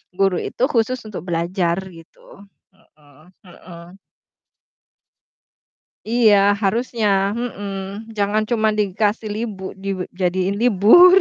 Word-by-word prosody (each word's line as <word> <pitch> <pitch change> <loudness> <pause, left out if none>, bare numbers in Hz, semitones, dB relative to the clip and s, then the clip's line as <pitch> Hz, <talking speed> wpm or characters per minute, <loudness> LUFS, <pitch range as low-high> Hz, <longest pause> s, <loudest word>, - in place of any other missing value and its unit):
guru 195 -1 +1
itu - - -4
khusus 235 +1 +1
untuk 205 -5 -8
belajar 170 +1 -1 0.2
gitu. 165 +3 -17 0.3
Mhm 155 -1 -24
mhm. 175 0 -14 2.1
Iya, 225 -2 +4 0.2
harusnya, 205 -2 0
mhm, 205 -2 -6
jangan 205 +2 +1
cuma 220 -2 +2
dikasih 210 +2 -1
libu 210 -4 -5
dijadiin 190 0 -2
libur. 245 - +7
195 Hz, 90 wpm, -20 LUFS, 185-220 Hz, 2.1 s, libur